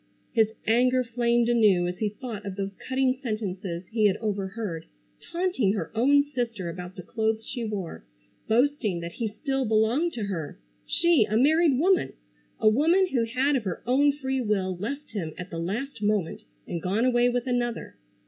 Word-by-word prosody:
His 220 -2 +2
anger 250 +3 +3
flamed 235 0 +1
anew 210 -7 +4
as 180 0 -5
he 215 - +1
thought 215 -1 -7
of 200 -2 -5
those 195 0 -3 0.2
cutting 260 0 +1
sentences 195 -7 -4
he 220 -2 +4
had 195 0 +1
overheard, 200 -4 -4 0.3
taunting 340 - 0
her 185 -7 -3
own 280 +6 +4
sister 235 -10 -3
about 180 +2 -7
the 180 - -8
clothes 220 +2 -1
she 240 - -4
wore. 195 - -5 0.4
Boasting 230 - +1
that 170 0 -5
he 225 +5 -3
still 270 +5 -2
belonged 230 +9 +2
to 225 - -4
her! 170 -7 -4 0.3
She, 340 -9 +3
a 215 +1 0
married 305 +2 +4
woman! 370 +6 +2 0.5
A - - +3
woman 330 - +4
who 240 -6 +1
had 260 +5 +1
of 250 - 0
her 185 - -4
own 275 +4 +4
free 265 -2 -2
will 195 -5 0
left 275 +11 -5
him 170 -8 -4
at 180 0 -7
the 165 - -4
last 220 +9 -4
moment 205 -5 -1 0.2
and 170 - -4
gone 200 +7 +1
away 245 -1 +3
with 245 0 -1
another! 245 -2 -2
225 Hz, 175 wpm, -26 LUFS, 200-260 Hz, 0.5 s, anew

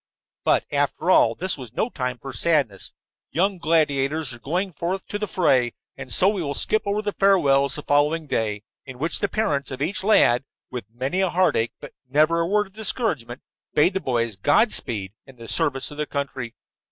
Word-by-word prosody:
But, - - +2
after 145 +5 +1
all, 115 -9 +5
this 185 -1 -3
was 120 -3 -9
no 220 - 0
time 125 -2 -3
for 135 +3 -8
sadness. 140 - +1 0.4
Young 190 +2 0
gladiators 150 -3 +1
were 120 - -11
going 180 +8 -2
forth 180 +5 -3
to 205 - -3
the 210 - -2
fray. 130 -11 +2 0.2
And 130 - -9
so 180 - +4
we 200 -2 +1
will 140 -3 -3
skip 215 - +2
over 205 +1 0
the 205 - -1
farewells 140 -10 +3
the 150 - -6
following 150 +3 +2
day, 105 -6 -2 0.2
in 130 -2 -10
which 160 +6 -2
the 200 - 0
parents 150 -11 -1
of 130 - -6
each 170 +8 -1
lad, 140 - +4 0.3
with 125 -5 -5
many 130 +11 -2
a 190 - +2
heartache 170 -11 +1
but - - -10 0.2
never 155 +5 +3
a 165 - +1
word 210 +2 +2
of 190 - -19
discouragement, 190 - -2 0.3
bade 160 +6 +4
the 190 - 0
boys 115 -5 -1
Godspeed 115 - +1
in 135 - -14
the 115 -1 -11
service 135 +4 0
of 145 - -10
their 150 -1 -2
country. 135 -4 -4
145 Hz, 195 wpm, -23 LUFS, 125-185 Hz, 0.4 s, all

